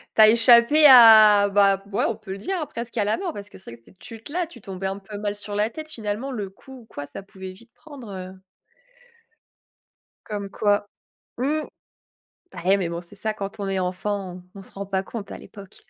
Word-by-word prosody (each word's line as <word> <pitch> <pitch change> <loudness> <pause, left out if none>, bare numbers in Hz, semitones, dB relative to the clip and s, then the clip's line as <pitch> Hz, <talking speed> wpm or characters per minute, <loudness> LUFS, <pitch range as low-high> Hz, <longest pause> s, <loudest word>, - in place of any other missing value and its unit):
Tu 220 - +5
as 215 - +9
échappé 235 +6 +6
à 215 -5 +8
bah, 195 -1 +3
ouais, 200 - 0
on - - -2
peut 190 - -11
le 195 - -5
dire, 380 - -3
hein, 305 - -3
presque 235 -2 -8
à 210 - +2
la 210 +8 0
mort 370 -3 -4
parce 205 0 -9
que - - -14
c'est 115 - -11
que - - -20
cette 185 - -21
chute-là, 290 +10 -5
tu 250 -8 -15
tombais 190 -1 -6
un 195 +1 -4
peu 205 +1 -10
mal 205 -1 -3
sur 205 0 -7
la 210 +2 +1
tête, 310 +4 -9
finalement, 225 +1 -4
le 205 -6 -5
coup 265 +6 -14
ou 230 - -17
quoi, 145 -8 -8
ça 145 - -9
pouvait 190 -1 -10
vite 230 +5 -18
prendre, 280 -8 -12
heu 185 0 -9 1.8
Comme 205 -2 -5
quoi. 205 0 0 0.5
Mmh. 295 +5 0 0.9
Bah, - - -9
ouais, 195 +1 +4
mais 175 -3 -2
bon, 170 0 -5
c'est 180 +4 -16
ça 215 +1 -3
quand 200 0 -7
on 200 - -3
est 190 -1 -1
enfant, 185 0 -4
on 195 - -11
se - - -12
rend 200 0 -6
pas 190 0 -2
compte 205 -1 -8
à - - -7
l'époque. 200 -2 -14
205 Hz, 225 wpm, -23 LUFS, 195-235 Hz, 1.8 s, as